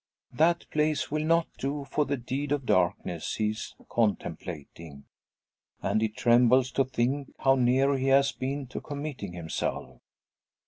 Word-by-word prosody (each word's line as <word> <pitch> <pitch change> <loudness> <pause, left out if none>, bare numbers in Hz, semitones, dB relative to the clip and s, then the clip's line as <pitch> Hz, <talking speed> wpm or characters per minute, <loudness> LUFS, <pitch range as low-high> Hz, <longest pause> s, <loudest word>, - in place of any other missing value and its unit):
That 165 +6 +2
place 150 -1 0
will 155 0 0
not 165 +1 +3
do 140 +1 -3
for 145 +2 0
the 140 0 -1
deed 135 +4 -4
of 145 -3 0
darkness 90 -3 0
he 105 -1 +1
is 110 - -7
contemplating; 85 -8 -3 0.8
and 105 +3 0
he 110 - +1
trembles 125 +2 +4
to 135 - +2
think 130 +2 -1
how 135 - +4
near 135 +2 +3
he 135 0 -1
has 140 +1 +5
been 135 +2 -3
to - - -5
committing 145 -10 -6
himself! 85 -2 -4
130 Hz, 145 wpm, -28 LUFS, 110-140 Hz, 0.8 s, has